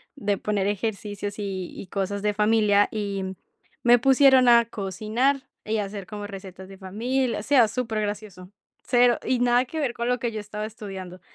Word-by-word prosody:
de 205 -7 -1
poner 205 -1 -1
ejercicios 205 0 -3
y 190 -3 -4
y - - -8
cosas 200 +1 -3
de 210 0 +1
familia, 210 -1 +3
y 195 -3 -3 0.5
me 240 0 +6
pusieron 265 0 +5
a 235 -1 +6
cocinar, 230 +6 -1 0.2
y 220 +1 -1
hacer 200 -1 -5
como 205 -1 -6
recetas 190 -2 -10
de 195 - -11
familia. 230 +6 -1
O - - -7
sea, 255 -3 +5
supergracioso, 210 -5 -4 0.3
cero 245 -1 +3
y 255 - +1
nada 245 +1 +3
que 315 +5 -5
ver 270 -5 -1
con 235 0 -3
lo 250 - +2
que 235 0 -2
yo 220 - -4
estaba 210 +1 -6
estudiando. 195 -4 -8
210 Hz, 175 wpm, -25 LUFS, 200-240 Hz, 0.5 s, me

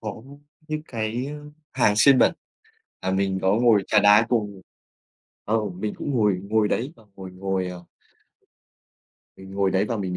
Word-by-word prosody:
có 110 0 -7 0.5
những 155 0 -3
cái, 115 +2 -3
ơ, 150 0 -9 0.2
hàng 105 -5 +2
xiên 130 +3 +6
bẩn - - +4 0.7
và 95 - -2
mình 95 0 0
có 95 +1 +2
ngồi 115 -4 +3
trà 105 - +4
đá 105 +2 +6
cùng 105 -5 -2 0.8
ờ, 110 +2 +1
mình 95 +4 -5
cũng 145 - -4
ngồi 105 -6 +2
ngồi 105 +1 +1
đấy 130 +9 -2
và - - -20
ngồi 95 -1 -9
ngồi, 95 0 -3
ờ 90 -1 -9 1.5
Mình 95 0 -13
ngồi 100 -1 +1
đấy 95 +2 +1
và 115 - -3
mình, 95 -3 -3
105 Hz, 170 wpm, -23 LUFS, 95-115 Hz, 1.5 s, xiên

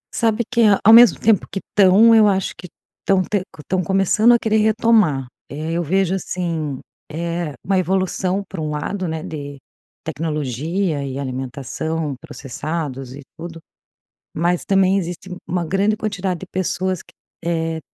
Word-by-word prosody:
Sabe 230 0 +1
que, 235 -1 +1 0.2
ao 220 +2 +8
mesmo 235 0 +8
tempo 215 -3 +2
que - - -4
estão, 205 +4 +5
eu 220 -2 +6
acho 195 -2 0
que 180 - -10 0.3
estão 190 -1 +2
te 205 +1 -1 0.2
estão 185 +4 -1
começando 195 +5 +3
a 235 - +5
querer 220 -1 0
retomar. 215 - +3 0.2
Eh, 155 +3 -5
eu 170 - 0
vejo 190 +3 +1
assim, 165 -7 -3 0.3
eh, 170 -1 -3
uma 190 0 +2
evolução 190 +1 0
para 190 -4 -6
um 155 - -2
lado, 180 +6 -3
né, 160 -1 -4
de 145 -2 -7 0.5
tecnologia 155 +2 -2
e 135 -1 -5
alimentação, 140 +4 -4
processados 135 -2 -5
e 145 - -10
tudo. 165 0 -8 0.7
Mas 175 +2 0
também 195 0 +3
existe 180 0 -5 0.2
uma 175 -1 -2
grande 200 +5 +1
quantidade 195 -5 -3
de 190 - -8
pessoas 185 0 -2
que - - -22 0.3
eh, 165 -1 -1
175 Hz, 150 wpm, -20 LUFS, 155-195 Hz, 0.7 s, ao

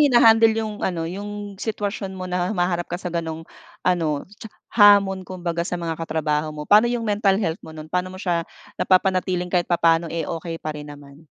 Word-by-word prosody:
hinahandle 230 -5 +6
'yong 215 -1 -3
ano, 170 -3 -1
'yong 205 +1 -6
sitwasyon 205 -2 -3
mo 185 - -5
na 180 0 -1
humaharap 175 -3 -1
ka 175 - -3
sa 180 -2 -5
gano'ng 165 -1 -4 0.4
ano 165 -5 +1 0.2
cha 220 - -8 0.2
hamon 200 -3 +6
kumbaga 175 -2 -3
sa 180 - -2
mga 165 -1 -3
katrabaho 155 -1 -1
mo? 150 0 -6
Paano 215 +3 +6
'yong 240 -1 -2
mental 205 -2 +2
health 165 -4 -2
mo 160 - -10
no'n, 155 0 -9
paano 180 0 0
mo - - -9
siya 170 -2 0 0.4
napapanatiling 185 -1 +2
kahit 175 -2 +1
papaano, 165 -1 +3
eh, 165 0 -3
okay 165 0 -4
pa 155 - -4
rin 150 0 -8
naman? 140 -1 -14
180 Hz, 190 wpm, -23 LUFS, 165-205 Hz, 0.4 s, hinahandle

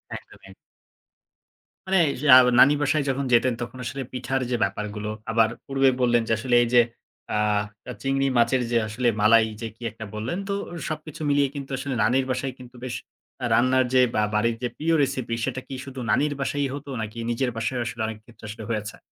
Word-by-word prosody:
একদমই - - -12
এক - - -13 1.4
মানে 190 -1 +4
এই - - -1
যা 140 -4 +9 0.2
নানি 140 +3 +8
বাসায় 145 +1 +2
যখন 135 +1 -1
যেতেন 120 +1 +4
তখন 120 +2 -6
আসলে 135 +3 -4
পিঠার 130 +1 -2
যে - - +2
ব্যাপারগুলো। 105 0 -3 0.2
আবার 115 0 +4 0.2
পূর্বে 135 -1 +3
বললেন, 120 -1 +3
যে - - -2
আসলে 120 +2 0
এই - - -1
যে 120 - +8 0.5
আ - - +2 0.6
চিংড়ি 135 0 +1
মাছের 120 +2 +3
যে 120 - +3
আসলে 115 +3 -1
মালাই 110 +1 +5
যে 115 - -3
কি 115 - -33
একটা 110 0 -9
বললেন। 120 - -3
তো - - 0 0.4
সবকিছু 155 0 -6
মিলিয়ে 145 0 +3
কিন্তু 140 -1 -6
আসলে 135 0 -3
নানির 130 +3 +2
বাসায় 130 +1 -2
কিন্তু 125 0 -13
বেশ 125 -1 -4 0.5
আ - - +1
রান্নার 130 +1 +3
যে 130 - +6
বা 110 - +3
বাড়ির 115 +2 +2
যে - - +1
প্রিয় 165 +2 +1
recipe 130 -4 -2
সেটা 130 -1 -3
কি 135 - -6
শুধু 135 -1 -8
নানির 145 +5 +2
বাসায়ই 140 0 -1
হতো 145 0 -7
নাকি 110 +1 -6
নিজের 125 +2 0
বাসায়ও 120 +2 -1
আসলে 120 -1 -5
অনেক 110 -1 -5
ক্ষেত্রে 120 -2 -15
আসলে 110 +1 -7
হয়েছে? 110 -2 -3
125 Hz, 195 wpm, -24 LUFS, 115-135 Hz, 1.4 s, যা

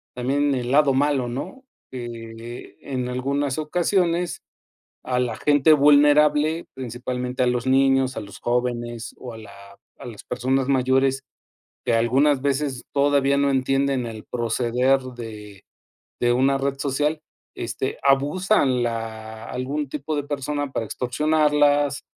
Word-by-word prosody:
también 140 +3 +1
el 125 -1 -2
lado 140 -1 +4
malo, 140 -2 +1
¿no?, 180 - -6 0.3
eh, 115 -1 -8
en 130 -3 -4
algunas 135 +2 -1
ocasiones 175 +2 0 0.6
a 125 -1 0
la 120 -3 -1
gente 145 +1 +4
vulnerable, 150 +2 +4
principalmente 125 0 -4
a - - 0
los 125 0 0
niños, 135 0 +3
a - - -2
los 100 -2 -10
jóvenes 120 -1 -2
o 125 - -8
a - - -10
la 100 -2 -14 0.2
a - - -10
las 115 -4 -10
personas 130 +2 0
mayores 135 0 +2 0.6
que 120 - +1
algunas 130 +5 +3
veces 135 -2 -1
todavía 140 -1 +3
no 140 0 +2
entienden 135 -1 +1
el 110 -2 -7
proceder 125 +3 +1
de 110 -6 -9 0.6
de 120 0 +3
una 135 +2 +3
red 135 0 -1
social, 145 +2 -1 0.3
este - - -4
abusan 140 - +2
la 110 -1 -5
algún 135 +3 -3
tipo 150 +1 -3
de 145 - -1
persona 145 0 -3
para 115 - -2
extorsionarlas 145 +2 +1
135 Hz, 135 wpm, -23 LUFS, 120-145 Hz, 0.6 s, lado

